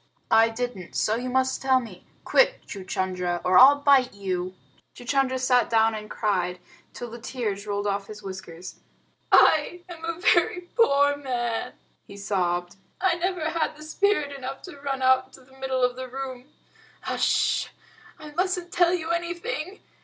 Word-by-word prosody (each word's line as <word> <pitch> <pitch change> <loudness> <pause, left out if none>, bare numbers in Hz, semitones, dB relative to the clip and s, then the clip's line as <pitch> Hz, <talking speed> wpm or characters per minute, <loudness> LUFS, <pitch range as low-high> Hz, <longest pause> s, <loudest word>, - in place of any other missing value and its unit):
"I 225 0 +6
didn't 225 -6 -5
so 215 - +1
you 250 +2 -3
must 260 +1 0
tell 265 -1 +3
me. 210 -8 -11 0.2
Quick, - - +3
Chuchundra, 185 -2 -3
or 180 0 +6
I'll 270 +3 +9
bite 275 -4 +3
you!" 185 -2 -3 0.4
Chuchundra 260 +1 0
sat 250 -1 +2
down 225 -1 +3
and 215 -1 -7
cried 180 -4 -1 0.3
till 240 -2 -8
the 235 - -8
tears 215 -5 -4
rolled 205 0 -2
off 200 -1 -2
his 210 -1 -10
whiskers. 185 -2 -9 0.5
"I 330 +3 +4
am 340 -2 -10
a 330 0 -3
very 355 0 +3
poor 285 - +4
man," 240 -4 -3 0.3
he 200 - -11
sobbed. 180 -3 -2 0.2
"I 370 -1 +2
never 345 -1 -2
had 320 -2 -1
spirit 310 -3 0
enough 270 0 -7
to 290 -7 -11
run 270 -2 -3
out 260 0 +4
into 260 - -17
the 265 +1 -20
middle 260 -1 -1
of 250 0 +2
the 260 0 -6
room. 260 0 -7 0.6
H'sh! - - +1 0.5
I 305 -2 -11
mustn't 360 +1 -1
tell 350 0 +3
you 330 -1 -3
anything. 340 0 -4
255 Hz, 160 wpm, -25 LUFS, 205-300 Hz, 0.6 s, I'll